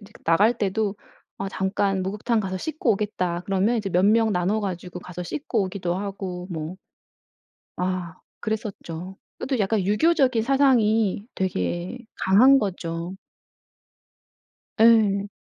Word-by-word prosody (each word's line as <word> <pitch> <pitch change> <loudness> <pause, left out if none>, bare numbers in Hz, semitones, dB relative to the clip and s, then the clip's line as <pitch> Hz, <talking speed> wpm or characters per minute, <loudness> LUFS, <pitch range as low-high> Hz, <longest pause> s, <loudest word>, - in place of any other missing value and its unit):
이제 210 0 -16
나갈 205 +9 +4
때도 205 0 -1 0.4
"아 195 - -3
잠깐 195 0 0
목욕탕 210 +4 -1
가서 190 -2 -3
씻고 310 -2 0
오겠다." 185 -4 -2
그러면 200 +4 +1
이제 210 -3 -2
몇 180 +2 +3
명 220 +1 +4
나눠 185 +4 +1
가지고 180 -3 -5
가서 180 0 -7
씻고 220 - -2
오기도 180 -2 -3
하고 190 -2 -5
뭐. 160 +2 -5 1.0
아 180 -2 -2 0.3
그랬었죠. 190 -4 -5 0.2
그것도 260 -3 -2
약간 205 0 +1
유교적인 255 - +3
사상이 225 -6 +3
되게 175 - -2 0.2
강한 255 +9 +5
거죠. 175 -3 -4 1.7
예. 205 -3 +4
195 Hz, 255 characters per minute, -24 LUFS, 180-220 Hz, 1.7 s, 강한